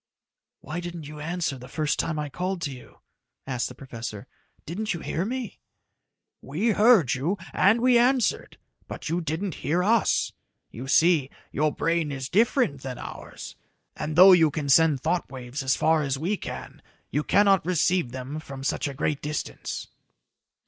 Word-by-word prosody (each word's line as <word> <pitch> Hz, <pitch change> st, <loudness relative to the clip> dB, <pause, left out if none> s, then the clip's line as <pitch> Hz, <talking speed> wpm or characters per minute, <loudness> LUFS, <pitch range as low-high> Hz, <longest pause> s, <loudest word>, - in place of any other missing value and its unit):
"Why 155 Hz, +5 st, -5 dB
didn't 175 Hz, -2 st, -6 dB
you 150 Hz, 0 st, -9 dB
answer 160 Hz, -3 st, -2 dB
the 125 Hz, -, -10 dB
first 155 Hz, 0 st, -1 dB
time 155 Hz, -, -1 dB
I 150 Hz, 0 st, -2 dB
called 180 Hz, +5 st, -3 dB
to 145 Hz, -, -2 dB
you?" 125 Hz, -2 st, -13 dB, 0.4 s
asked 130 Hz, -3 st, -2 dB
the -, -, -11 dB
professor. 115 Hz, -6 st, -7 dB, 0.4 s
"Didn't 205 Hz, +5 st, -3 dB
you 165 Hz, -, -7 dB
hear 170 Hz, -, -2 dB
me?" 250 Hz, -1 st, -4 dB, 0.8 s
"We 165 Hz, -, -1 dB
heard 210 Hz, -, +5 dB
you, 155 Hz, +10 st, -1 dB, 0.2 s
and 220 Hz, +5 st, +4 dB
we 250 Hz, -1 st, +5 dB
answered, 250 Hz, 0 st, +1 dB, 0.3 s
but -, -, -6 dB
you 170 Hz, +2 st, 0 dB
didn't 165 Hz, +3 st, -3 dB
hear 170 Hz, +5 st, +1 dB
us. 225 Hz, +2 st, +2 dB, 0.4 s
You 125 Hz, +4 st, -7 dB
see, 155 Hz, -1 st, +4 dB, 0.2 s
your 155 Hz, +1 st, +1 dB
brain 165 Hz, 0 st, 0 dB
is 130 Hz, -1 st, -5 dB
different 220 Hz, -, +2 dB
than 130 Hz, -2 st, -6 dB
ours, -, -, -9 dB, 0.4 s
and 150 Hz, 0 st, -4 dB
though 185 Hz, +3 st, +9 dB
you 165 Hz, -4 st, +6 dB
can 145 Hz, -1 st, -4 dB
send 150 Hz, -1 st, +5 dB
thought 170 Hz, -2 st, -1 dB
waves 130 Hz, +1 st, -6 dB
as 130 Hz, 0 st, +2 dB
far 160 Hz, 0 st, +3 dB
as 135 Hz, -2 st, -1 dB
we 175 Hz, +9 st, -1 dB
can -, -, -8 dB, 0.3 s
you 150 Hz, -, 0 dB
cannot 200 Hz, 0 st, +4 dB
receive 175 Hz, -4 st, +1 dB
them 130 Hz, +4 st, -5 dB
from 135 Hz, -3 st, -9 dB
such 140 Hz, -, -1 dB
a 140 Hz, -, -6 dB
great 150 Hz, +1 st, -1 dB
distance." 150 Hz, +1 st, -4 dB
160 Hz, 170 wpm, -26 LUFS, 140-185 Hz, 0.8 s, though